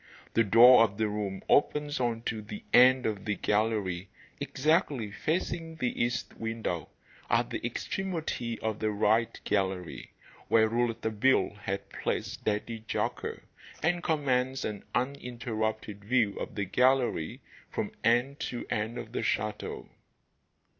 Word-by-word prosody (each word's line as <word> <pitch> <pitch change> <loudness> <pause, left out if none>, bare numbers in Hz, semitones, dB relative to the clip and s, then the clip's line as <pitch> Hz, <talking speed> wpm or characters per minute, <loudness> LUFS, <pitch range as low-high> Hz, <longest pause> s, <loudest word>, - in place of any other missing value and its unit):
The 115 - +4
door 115 +3 +8
of 100 -3 -1
the 110 -1 +1
room 105 -2 -3
opens 150 0 +2
on 115 -2 -1
to 110 -2 -2
the 105 0 -8
end 130 +1 +7
of 105 -3 -2
the 105 -2 0
gallery, 105 -4 0 0.3
exactly 145 - +1
facing 165 - -2
the 125 -6 -1
east 120 0 -2
window, 115 -8 -3 0.4
at - - +2
the - - -4
extremity 160 -11 -3
of 110 -1 -2
the 110 - 0
'right' 110 +2 +1
gallery, 95 -3 -2 0.4
where 110 -1 +5
Rouletabille 115 0 +1
had 100 +1 -3
placed - - -3
Daddy 110 +1 -2
Jacques, - - -2 0.4
and 175 +2 +2
commands 130 -5 0
an 105 -2 -4
uninterrupted 115 -5 -2
view 110 -2 +2
of - - -5
the 100 -2 -1
gallery 125 -6 +2 0.3
from - - -3
end 120 +5 +2
to 120 - -4
end 110 +3 -1
of 115 -2 -7
the - - -2
chateau. 105 0 -2
115 Hz, 135 wpm, -29 LUFS, 105-130 Hz, 0.4 s, door